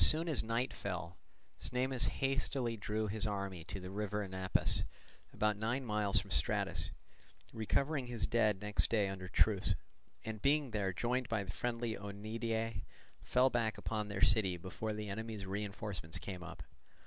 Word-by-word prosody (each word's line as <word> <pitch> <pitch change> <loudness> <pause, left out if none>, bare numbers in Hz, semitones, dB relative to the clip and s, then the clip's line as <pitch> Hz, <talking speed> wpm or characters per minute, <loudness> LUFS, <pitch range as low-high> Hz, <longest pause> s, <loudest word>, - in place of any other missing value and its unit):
As - - +13
soon 160 +2 +6
as 155 -7 +2
night 115 +3 0
fell, 90 -3 -4 0.4
Cnemus 125 0 +1
hastily 135 -3 0
drew 110 0 -1
off 105 - -2
his 110 0 +1
army 100 -4 -2
to 95 +2 -5
the 90 0 -7
river 105 +1 -1
Anapus, 95 -1 +1 0.5
about 105 -1 +1
nine 120 +5 -1
miles 105 -3 +2
from - - -1
Stratus, - - +2 0.6
recovering 135 +5 +1
his 120 -3 0
dead 105 -4 +2
next 105 0 +2
day 105 -3 +3
under 95 -1 -5
truce, 95 +1 +3 0.5
and 110 -2 -4
being 140 -2 +3
there 100 -3 +1
joined 120 +6 0
by 110 -3 +1
the 95 - -5
friendly 120 -1 -1
Oeniadae, 110 +1 -2 0.4
fell 130 +1 +4
back 110 -3 +1
upon 105 0 -2
their 100 -2 -1
city 100 -4 +5
before 95 +5 -4
the 105 0 -4
enemy's 110 0 -4
reinforcements 100 -4 -3
came 90 0 -5
up. 90 - -7
105 Hz, 160 wpm, -36 LUFS, 100-115 Hz, 0.6 s, As